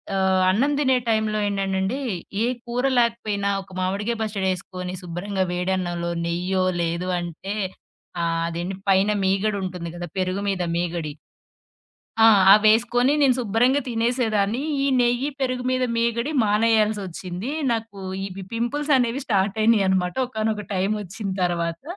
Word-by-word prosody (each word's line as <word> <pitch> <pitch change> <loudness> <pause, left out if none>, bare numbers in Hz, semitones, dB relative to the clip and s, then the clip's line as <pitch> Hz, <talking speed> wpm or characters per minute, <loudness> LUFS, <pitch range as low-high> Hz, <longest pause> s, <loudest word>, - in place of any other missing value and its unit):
ఆహ్, 190 -1 +2
అన్నం 245 +10 +2
దినే 265 -3 +3
టైంలో 220 -1 +1
ఏంటండండి, 195 +3 -1 0.5
ఏ - - +3 0.2
కూర 240 +1 -2
లేకపోయినా 220 -4 +1
ఒక 190 - -16
మామిడిగాయ 200 +5 -1
పచ్చడేసుకొని, 185 -3 -3
శుభ్రంగా 185 +3 -3
వేడన్నంలో 180 -1 -1 0.2
నెయ్యో 180 +2 0 0.2
లేదు 170 +2 -2
అంటే 175 +3 -5 0.7
ఆహ్, 165 0 0
అదేండి 175 +3 -4
పైన 195 +1 +4 0.2
మీగడుంటుంది 190 -3 -1
కదా! 175 0 -5
పెరుగు 185 +1 -1
మీద 190 -2 0
మీగడి, 170 -3 -2 1.1
ఆ! - - +9 0.3
అవేసుకొని 235 +5 +3
నేను 260 -3 +4
శుభ్రంగా 245 +5 +2
తినేసేదాన్ని. 230 -1 0 0.2
ఈ - - +2
నెయ్యి, 245 +4 +1
పెరుగు 255 -1 -1
మీద 255 0 +1
మీగడి 235 +5 0
మానేయాల్సొచ్చింది. 210 - 0 0.2
నాకు 225 -3 -4 0.3
ఇవి 190 0 -8
పింపుల్స్ 290 +6 -1
అనేవి 245 +2 0
స్టార్ట్ 200 -1 +1
అయినాయినమాట. 190 -5 +3
ఒకానొక 215 -3 -2
టైమొచ్చిన 200 +1 -2
తర్వాత. 170 -1 -1
200 Hz, 120 wpm, -23 LUFS, 185-230 Hz, 1.1 s, ఆ